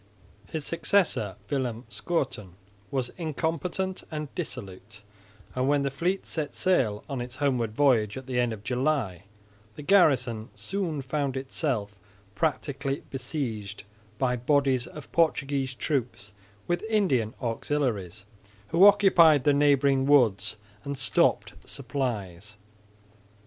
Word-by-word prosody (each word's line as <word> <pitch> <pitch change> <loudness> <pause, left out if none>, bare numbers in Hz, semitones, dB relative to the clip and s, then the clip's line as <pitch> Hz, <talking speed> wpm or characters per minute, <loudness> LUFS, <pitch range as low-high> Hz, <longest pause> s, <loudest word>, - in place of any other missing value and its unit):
His 155 -3 -5
successor, 165 - +1
Willem 125 -3 -2
Schouten, 115 - -3 0.4
was 130 -3 -2
incompetent 165 +4 -2
and 150 -3 -5
dissolute; 105 - -7 0.5
and, 130 +1 0
when 145 -1 +3
the 140 - -1
fleet 175 +8 -1
set 155 -3 -4
sail 125 - +1
on 135 -4 -4
its 125 +1 -6
homeward 125 -7 0
voyage 115 -7 +3
at 130 - -7
the 125 -1 -1
end 120 -1 +1
of 105 -2 -7
July, 125 - -1 0.5
the 150 - -8
garrison 130 - +3
soon 175 -8 -3
found 135 0 -2
itself 125 - -2 0.3
practically 140 +2 -2
besieged 120 -7 -4 0.3
by 125 0 +1
bodies 130 -1 +1
of 150 - -11
Portuguese 140 -5 +1
troops 120 -7 -3 0.3
with 175 0 -1
Indian 140 - +1
auxiliaries, 115 - -2 0.4
who 175 +5 +7
occupied 175 -8 +6
the 145 - +4
neighbouring 140 -2 +3
woods 115 -9 +3 0.3
and 140 0 -4
stopped 130 - +2
supplies. 110 -7 -4
135 Hz, 120 wpm, -27 LUFS, 115-150 Hz, 0.5 s, who